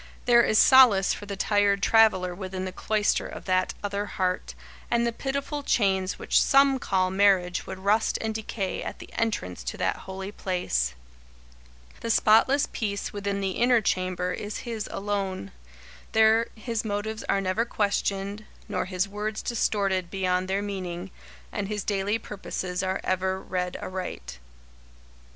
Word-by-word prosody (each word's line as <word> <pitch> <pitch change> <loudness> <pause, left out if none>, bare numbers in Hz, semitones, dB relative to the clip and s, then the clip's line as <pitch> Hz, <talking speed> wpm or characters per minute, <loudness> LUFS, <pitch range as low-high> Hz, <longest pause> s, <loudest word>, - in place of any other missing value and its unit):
There 240 -1 +6
is 215 - +2
solace 240 -8 +7
for 205 - -8
the 200 - -4
tired 200 0 +2
traveller 215 -5 +4
within 185 0 -5
the 185 - -4
cloister 210 +2 0
of - - -9
that 185 -1 +1
other 205 0 -2
heart, 185 -2 -2 0.3
and 235 0 +2
the 235 - +1
pitiful 280 +3 -3
chains 195 -7 +1
which - - +2
some 275 -1 +4
call 185 -5 0
marriage 190 -2 +2
would - - -6
rust 205 +4 +1
and 220 -1 -2
decay 215 -3 -3
at - - -5
the - - -12
entrance 90 - -2
to - - -4
that - - 0
holy 190 +1 -6
place. 65 - -1 1.0
The 230 - -5
spotless 225 +6 +4
peace 200 -3 -3
within 200 -1 -2
the 195 -1 -1
inner 240 +4 +3
chamber 185 -3 -1
is 205 +3 -5
his 225 -3 -4
alone. 195 - -3 0.6
There 220 +1 +5
his 225 0 -3
motives 215 +1 -3
are 195 - +3
never 195 +3 0
questioned, 205 -2 -1 0.2
nor - - -2
his 185 +1 -1
words 210 +2 -4
distorted 195 -6 0
beyond 185 -1 0
their 195 +1 -1
meaning, 185 -2 -5 0.4
and 200 -1 -3
his 210 -1 -3
daily 205 +1 0
purposes 185 -4 -5
are 190 0 -2
ever 190 0 0
read 180 -1 -3
aright. 120 - -6
200 Hz, 150 wpm, -26 LUFS, 185-220 Hz, 1.0 s, solace